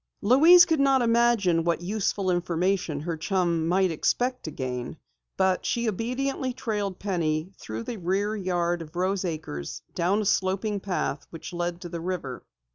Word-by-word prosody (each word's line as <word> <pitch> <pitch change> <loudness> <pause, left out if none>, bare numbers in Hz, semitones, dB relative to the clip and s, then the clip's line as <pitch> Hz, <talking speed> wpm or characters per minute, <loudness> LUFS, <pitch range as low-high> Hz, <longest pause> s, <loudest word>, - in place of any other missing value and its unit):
Louise 320 - +8
could 320 -3 +1
not 270 -2 +4
imagine 230 -8 +3
what 170 0 0
useful 195 -1 0
information 175 -2 0
her 165 +1 -3
chum 170 -1 0
might 185 +1 +2
expect 250 +10 0
to - - -4
gain, 125 -1 -5 0.4
but 190 -1 +2
she 235 -1 -1
obediently 255 +5 -2
trailed 205 -6 -3
Penny 170 -3 -1
through 110 +1 -6
the 230 - -5
rear 200 +4 -1
yard 175 -3 -1
of 155 +1 -10
Rose 185 +2 0
Acres, 155 - -5
down 180 +4 +1
a - - -5
sloping 195 +2 0
path 180 -7 -3
which 165 +1 -9
led 175 0 -3
to 175 - -7
the 170 0 -5
river. 165 -8 -4
185 Hz, 160 wpm, -26 LUFS, 170-215 Hz, 0.4 s, Louise